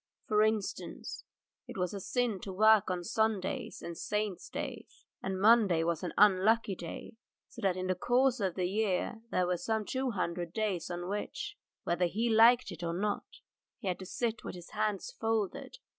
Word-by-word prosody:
For 215 -5 +3
instance, 215 -2 -2 0.4
it - - -8
was 180 0 -1
a 200 - -4
sin 235 0 -1
to 195 - -6
work 215 +1 +5
on 180 -1 -2
Sundays 220 0 -1
or 170 - -4
Saints' 210 +2 -3
days, - - -7 0.2
and 190 0 -3
Monday 205 -6 +5
was 170 -1 0
an 180 - -3
unlucky 210 +2 +4
day, 175 +5 -8 0.3
so - - -11
that 190 -2 +1
in 185 - -2
the 185 - +1
course 250 +6 +2
of 190 -4 -1
the 185 - 0
year 210 +3 0
there 180 - +1
were 180 0 0
some 220 +4 -1
two 260 +3 -1
hundred 175 -5 -2
days 205 -6 -1
on 175 0 -4
which, 205 - -4 0.3
whether 175 +1 +1
he 225 +7 0
liked 230 0 +6
it 175 - -8
or 170 -1 -2
not, 205 +2 -3 0.4
he 230 - -7
had 180 - -1
to 185 - -8
sit 230 +2 -2
with - - -6
his 175 -1 -11
hands 215 - -1
folded. 225 - -1
200 Hz, 185 wpm, -32 LUFS, 180-220 Hz, 0.4 s, liked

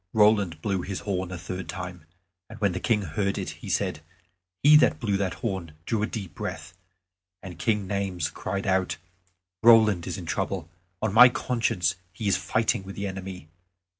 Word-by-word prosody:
Roland 105 -7 +3
blew 95 -3 0
his 95 +1 -5
horn 95 -3 -2
a 90 - -4
third 90 +2 -6
time, 90 -3 -6 0.4
and 110 0 -10
when 100 -2 +2
the 90 - -3
King 105 -1 +1
heard 100 +4 -1
it - - -3
he - - -7
said, - - 0 0.6
"He 150 +2 +8
that 150 - +3
blew 105 -3 0
that 95 -2 -1
horn 95 -7 -3
drew 115 -3 0
a 110 - +1
deep 100 -9 -6
breath." 85 +2 -6 0.7
And 90 -2 -8
Duke 105 +3 0
Naymes 95 -4 -2
cried 100 +1 -3
out, 95 -1 +1 0.6
"Roland 110 -6 +6
is 90 - -3
in 90 - -7
trouble; 95 0 -2 0.4
on 110 -3 0
my 125 +3 +10
conscience 100 -8 0
he 100 +4 -4
is 100 - +4
fighting 110 0 0
with 95 0 -9
the 100 - -3
enemy. 95 -3 -6
95 Hz, 180 wpm, -26 LUFS, 90-105 Hz, 0.7 s, my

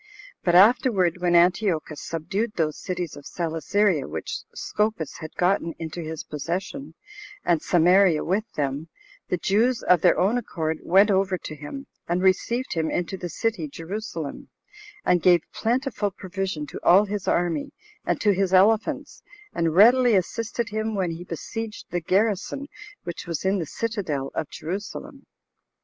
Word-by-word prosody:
But 175 -1 +2
afterward, 195 - +5
when 175 -1 +2
Antiochus 170 -4 +2
subdued 190 +8 -3
those 155 -3 -1
cities 180 -4 -4
of 145 - -10
Celesyria 170 +1 0
which 80 +1 -4
Scopas 210 -8 -2
had 155 - -8
gotten 175 -2 +1
into 165 +1 -5
his 160 -1 -5
possession, 180 - -5 0.5
and 170 -3 +2
Samaria 175 -1 +4
with 205 +5 -1
them, 145 +2 -2 0.4
the 180 - +1
Jews, 225 +8 +1
of 180 -3 +4
their 175 - +4
own 210 +7 +2
accord, 160 -8 -3
went 195 +4 +4
over 190 -1 +2
to 155 - -8
him, 210 - -8 0.2
and 175 +2 0
received 235 +7 +1
him 160 -2 0
into 175 +2 -2
the 180 -2 -6
city 195 -2 -2
[Jerusalem], 165 -1 -6 0.6
and 175 -1 +3
gave 175 -2 +5
plentiful 240 -2 0
provision 185 -4 -4
to 140 - -8
all 195 +4 +6
his 205 -1 -4
army, 175 - 0 0.3
and - - -1
to 205 -2 +4
his 190 0 +1
elephants, 210 +4 +2 0.3
and 165 -1 0
readily 240 +3 +6
assisted 230 +5 -1
him 215 +1 -2
when 185 -4 0
he 165 +1 -7
besieged 215 +6 -6
the 175 - -1
garrison 205 - 0 0.4
which 175 0 -6
was 170 +1 -3
in 195 +1 +2
the 165 - -3
citadel 185 -13 -3
of 150 - -3
Jerusalem. 205 - -6
185 Hz, 150 wpm, -24 LUFS, 165-210 Hz, 0.6 s, all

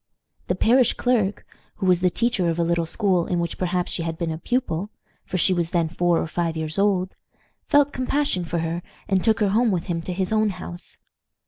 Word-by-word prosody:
The 180 - 0
parish 240 +5 +4
clerk, 220 -6 0 0.3
who 205 - -4
was 180 -2 +4
the 180 0 +3
teacher 200 -3 0
of 165 - -1
a 170 - +2
little 170 0 0
school 185 -2 +1
in 175 - 0
which 170 0 -3
perhaps 180 -1 -1
she - - -2
had 165 -1 -3
been 170 -1 -2
a 160 - -5
pupil 210 -5 -1 0.4
for 185 - -2
she 185 +2 +4
was 170 -2 0
then 170 -2 0
four 175 0 +1
or - - -1
five 165 0 -2
years 160 +3 -2
old 190 -2 +1 0.5
felt 290 -1 +4
compassion 255 -6 0
for 170 0 -3
her, 165 +1 -2 0.3
and 190 -2 +1
took 220 -2 +2
her 205 - +3
home 225 +4 +3
with 180 -4 0
him 170 -3 -2
to 180 - -5
his 185 +3 -1
own 215 -1 +3
house. 180 -2 -8
180 Hz, 220 wpm, -23 LUFS, 170-210 Hz, 0.5 s, parish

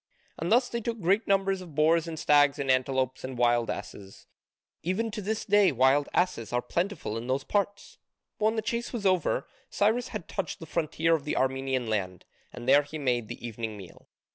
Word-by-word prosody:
And 170 +4 -2
thus 245 +2 +4
they 235 -1 -3
took 230 0 -3
great 195 +4 +2
numbers 195 -1 +2
of 170 -5 -11
boars 160 +2 +3
and 165 -1 -5
stags 145 -2 +4
and 140 -2 +1
antelopes 130 0 0
and 130 -1 -6
wild 120 -1 +2
asses: 100 -1 -7 0.6
even 215 +6 -1
to 210 - -5
this 215 +2 -2
day 205 -3 +5
wild 135 +2 +3
asses 175 -11 0
are 120 - +1
plentiful 170 - -2
in 120 - -8
those 130 +2 0
parts. 200 0 -2 0.4
But 215 - +1
when 220 +1 +3
the 220 - -1
chase 235 +1 -2
was 230 -5 -4
over, 185 -4 +1 0.2
Cyrus 220 +4 +1
had 165 - -6
touched 195 -4 -4
the 165 - -8
frontier 165 0 0
of 160 -3 +1
the 150 - -2
Armenian 130 -1 0
land, 95 -5 -3 0.3
and 120 0 -9
there 140 +2 +7
he 145 +2 -8
made 125 -6 0
the - - -8
evening 115 -2 -5
meal. 95 -3 -13
155 Hz, 200 wpm, -28 LUFS, 130-195 Hz, 0.6 s, there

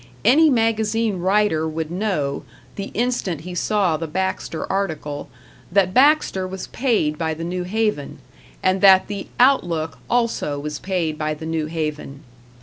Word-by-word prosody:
Any 305 +7 +6
magazine 225 -4 +1
writer 190 -3 +2
would 160 0 -4
know, 175 -8 -1 0.3
the 200 0 -5
instant 225 -9 -1
he 180 +2 -7
saw 185 -2 +1
the 165 +1 -4
Baxter 190 -1 -3
article, 160 -7 -3 0.4
that 185 -1 +2
Baxter 265 -8 +3
was 190 0 -6
paid 215 - 0
by 160 -1 -1
the 165 - -6
New 180 +1 -3
Haven, 210 -7 -1 0.5
and 185 0 +2
that 190 -2 +7
the 200 -1 -6
"Outlook" 165 - +2
also 230 -11 0
was 150 +1 -5
paid 170 -5 -2
by 155 0 -1
the 160 - -8
New 160 -1 -2
Haven. 150 -3 -4
185 Hz, 145 wpm, -21 LUFS, 155-210 Hz, 0.5 s, that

